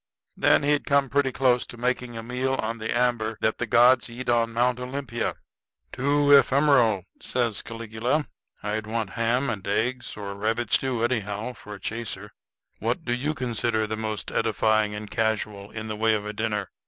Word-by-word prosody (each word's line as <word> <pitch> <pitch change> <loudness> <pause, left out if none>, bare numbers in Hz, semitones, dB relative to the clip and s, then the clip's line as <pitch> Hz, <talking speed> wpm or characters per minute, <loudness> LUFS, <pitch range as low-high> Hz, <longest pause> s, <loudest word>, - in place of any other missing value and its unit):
Then - - +4
he'd 145 0 +1
come 140 -1 +3
pretty 140 -1 +2
close 125 -2 +2
to 120 - -10
making 125 -1 -2
a 115 - -5
meal 125 +3 -1
on 115 -1 -3
the 110 +1 -4
amber 120 -3 +1
that 110 - +1
the 120 - -1
gods 120 +3 +5
eat 120 +1 -6
on 115 -1 +2
Mount 125 +2 +1
Olympia." 125 -2 -3 0.6
"Too 145 +2 +2
ephemeral," 135 - +5 0.2
says 120 -4 0
Caligula. 115 +6 -2 0.4
"I'd 105 +1 -2
want 110 -3 -2
ham 120 +5 +1
and 105 -6 -4
eggs, 120 +5 -1
or 100 -1 -5
rabbit 110 +3 -2
stew, 125 -4 +2
anyhow, 110 -1 -1
for 105 -3 -10
a - - -12
chaser. 105 -1 -4 0.5
What - - -2
do 120 - 0
you 145 +5 -1
consider 115 -3 0
the 110 +1 -3
most 110 -1 -3
edifying 110 -1 +1
and 105 0 -6
casual 105 -2 -1
in 110 0 -6
the 110 - -3
way 110 +1 +2
of 105 -1 -3
a 105 - -4
dinner?" 105 -3 -2
115 Hz, 180 wpm, -25 LUFS, 110-125 Hz, 0.6 s, gods